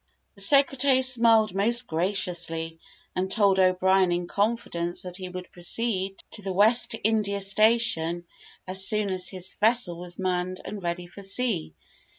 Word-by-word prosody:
The 200 - -4
secretary 275 +2 +4
smiled 230 -5 +4
most 235 +5 +1
graciously, 165 -3 -2 0.4
and 185 +1 -2
told 200 -2 +2
O'Brien 185 0 +3
in 175 0 -1
confidence, 185 -4 -2
that 180 -1 -7
he 185 -2 -7
would 180 0 -9
proceed 195 +1 -1 0.2
to 210 - -6
the 195 -1 -4
West 220 +5 +2
India 210 -2 0
station 195 -5 +1 0.4
as 190 +1 -1
soon 210 -1 +1
as 185 -1 -2
his 185 -1 -5
vessel 215 -6 +3
was 175 0 -8
manned 185 -1 -2
and 205 -1 -7
ready 175 0 -4
for 180 +3 -13
sea. 195 - -1
190 Hz, 150 wpm, -25 LUFS, 180-220 Hz, 0.4 s, secretary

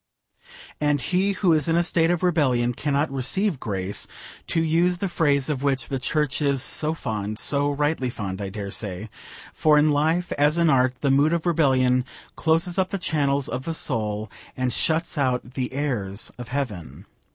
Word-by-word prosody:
And 145 -1 +1
he 185 +8 0
who 185 -3 +2
is 155 +1 +2
in 165 - +2
a 170 - +3
state 165 0 +2
of 175 0 0
rebellion 130 -9 +2
cannot 145 +3 -1
receive 140 +6 0
grace, 100 -2 -3 0.4
to 165 - 0
use 170 +3 +2
the 195 - -2
phrase 145 -6 +1
of 145 -4 -2
which 140 -2 -1
the 135 - -2
Church 150 +2 -1
is 140 -3 +1
so 155 +1 +2
fond 105 -6 -4
so 145 +4 +2
rightly 145 -2 0
fond, 100 -4 -5
I 100 - -4
dare 100 -1 -6
say 105 +1 -3 0.4
for 150 -1 +3
in 150 +1 +4
life 160 +5 +1
as 150 +3 +3
in 170 -2 +4
art 130 -1 +2
the 140 - +2
mood 145 +4 +3
of 170 0 -1
rebellion 130 -6 +3 0.3
closes 165 +3 +1
up 185 -1 +1
the 200 - -2
channels 140 -6 0
of 125 +2 -5
the 165 - -3
soul, 110 -7 -1 0.3
and 130 -1 -1
shuts 160 -1 0
out 125 -2 -1
the 130 -2 -3
airs 120 -8 -2
of 125 -1 -8
heaven. 105 - -5
140 Hz, 185 wpm, -24 LUFS, 125-160 Hz, 0.4 s, in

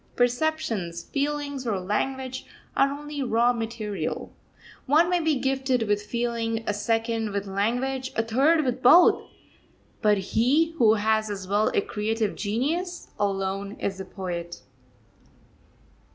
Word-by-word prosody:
Perceptions, 240 - 0
feelings, 285 -2 -2
or 205 -4 0
language, 260 +7 -3 0.3
are 275 - +4
only 295 +1 -5
raw 240 -1 +3
material. 220 -7 -4 0.5
One 320 +6 +4
may 355 - +3
be 320 -2 +1
gifted 265 -2 0
with 205 -1 0
feeling, 230 0 -2
a 210 - 0
second 225 +1 -1
with 200 0 -2
language, 245 +7 -1
a 225 - +1
third 280 +8 +3
with 255 0 -1
both; 340 +9 +7 0.8
but 210 -1 +4
he 250 - +2
who 220 -2 +6
has 215 0 +1
as 195 -2 -5
well 205 +2 +2
a - - +4
creative 215 0 -2
genius, 310 - -2
alone 195 0 -1
is 195 -2 -4
a 190 - -5
poet. 175 -3 -6
230 Hz, 130 wpm, -26 LUFS, 205-270 Hz, 0.8 s, both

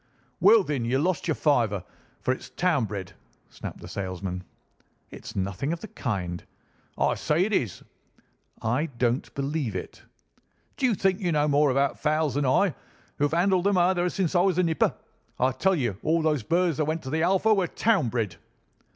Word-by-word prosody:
"Well, 205 +4 +6
then, 145 -7 -2
you've 130 +5 +1
lost 180 0 0
your 160 - +1
fiver, 115 - +1 0.4
for - - +1
it's 130 - -5
town 170 -9 +1
bred," 100 -3 -6 0.4
snapped - - -8
the - - -9
salesman. 95 -1 -4 0.7
"It's - - -9
nothing 100 - -2
of 170 - -4
the 220 - -7
kind." 95 - -3 0.5
"I - - +2
say 165 +5 +1
it 215 - -3
is." 115 - -1 0.8
"I 125 +8 +1
don't 120 +1 0
believe 140 -5 -2
it." 90 - -6 0.7
"D'you 255 -5 +1
think 190 +1 +1
you 180 -4 0
know 150 -1 +2
more 145 0 +3
about 135 +1 +1
fowls 155 -1 +1
than 140 0 0
I, 165 +7 +3 0.5
who 145 - +3
have 145 - -1
handled 185 0 +2
them 200 -1 +3
ever 180 0 +3
since 185 -3 -1
I 175 - +4
was 185 -2 +2
a 185 - +3
nipper? 165 -2 +1 0.4
I 130 +1 +3
tell 190 +8 +1
you, 120 - -2
all 165 +1 +1
those 155 -4 +1
birds 170 +5 +1
that 155 - +1
went 160 +2 -2
to 130 - -6
the 160 +1 0
Alpha 195 +5 +3
were 190 -4 +1
town 195 - +1
bred." 110 -7 -2
150 Hz, 185 wpm, -26 LUFS, 120-180 Hz, 0.8 s, Well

